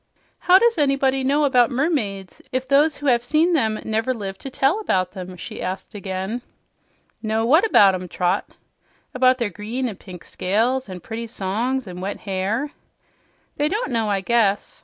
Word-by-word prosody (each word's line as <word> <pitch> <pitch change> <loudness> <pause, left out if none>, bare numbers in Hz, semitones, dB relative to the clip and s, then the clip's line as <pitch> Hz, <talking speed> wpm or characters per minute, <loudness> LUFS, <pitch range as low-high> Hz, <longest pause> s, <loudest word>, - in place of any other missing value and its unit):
"How 365 +1 +6
does 465 -3 +3
anybody 275 -2 +2
know 285 +3 +2
about 250 -4 +4
mermaids 240 - -2
if 255 0 -1
those 290 +3 +3
who 290 - -8
have 240 -3 +3
seen 315 +7 +2
them 220 -8 +1
never 225 +4 0
lived 195 -3 -6
to 270 - -5
tell 270 +9 +1
about 185 - 0
them?" 185 -2 -8
she - - -8
asked 190 +3 -5
again. 195 +3 -4 0.8
"Know 220 0 0
what 315 - +5
about 200 - +6
'em, 185 0 -4
Trot?" 180 +3 -1 0.6
"About 255 0 +4
their 230 -5 -2
green 225 +7 -3
and 210 -5 -7
pink 180 -3 -11
scales 230 +6 -1
and 180 -2 -8
pretty 230 +1 -5
songs 230 +5 -2
and 180 -2 -8
wet 200 +2 -4
hair." 205 +8 -2 0.9
"They 295 - +2
don't 420 - -2
know, 225 -3 0
I 200 -1 0
guess. 205 -2 +1
230 Hz, 175 wpm, -22 LUFS, 195-270 Hz, 0.9 s, How